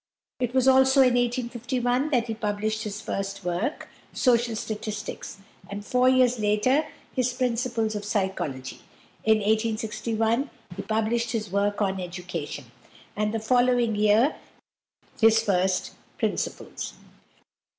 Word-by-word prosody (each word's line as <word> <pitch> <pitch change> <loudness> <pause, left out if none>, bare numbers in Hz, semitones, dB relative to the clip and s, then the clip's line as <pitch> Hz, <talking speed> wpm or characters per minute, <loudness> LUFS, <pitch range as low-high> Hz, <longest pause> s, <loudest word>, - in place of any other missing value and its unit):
It 250 0 -2
was 260 0 +3
also 265 +1 +6
in 250 -2 +5
1851 245 +2 0
that 245 -6 +2
he 225 - -3
published 215 0 -2
his 210 0 -4
first 195 -1 -4
work, 175 - -2 0.3
"Social 240 -2 +2
Statics," 215 -2 -5 0.3
and 205 +1 -6
four 250 +3 +3
years 250 -2 +4
later 215 +8 +2 0.3
his 255 -2 +1
"Principles 240 -3 0
of 210 -1 -4
Psychology." 155 - -2 0.5
In 220 0 +5
1861 220 +3 0 0.3
he - - -4
published 225 +2 0
his 215 -5 -3
work 205 +1 +1
on 190 -1 -1
"Education," 175 -7 -6 0.4
and 210 0 0
the 225 - -1
following 245 0 +3
year 215 +7 +3 0.8
his 225 0 +5
"First 185 -2 +1 0.2
Principles." - - -3
220 Hz, 120 wpm, -26 LUFS, 205-245 Hz, 0.8 s, also